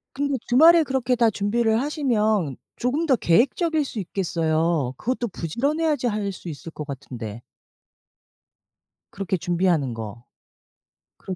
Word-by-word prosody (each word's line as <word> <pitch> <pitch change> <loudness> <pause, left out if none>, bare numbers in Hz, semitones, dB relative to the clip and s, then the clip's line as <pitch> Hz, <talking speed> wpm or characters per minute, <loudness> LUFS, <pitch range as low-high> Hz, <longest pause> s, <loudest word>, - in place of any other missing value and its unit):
근데 280 0 0
주말에 325 +7 +7
그렇게 265 -3 0
다 235 -2 +3
준비를 220 +2 +1
하시면 220 - 0 0.2
조금 275 +7 0
더 275 - +4
계획적일 285 - +2
수 250 - -7
있겠어요. 165 -6 0
그것도 245 - -2
부지런해야지 280 - -1
할 210 -3 -1
수 180 - -10
있을 160 +1 -7
것 150 - -7
같은데. 120 -5 -7 1.7
그렇게 195 -1 -2
준비하는 170 -6 +1
거 115 +1 -8 0.9
그렇 190 - -6
210 Hz, 285 characters per minute, -24 LUFS, 165-260 Hz, 1.7 s, 주말에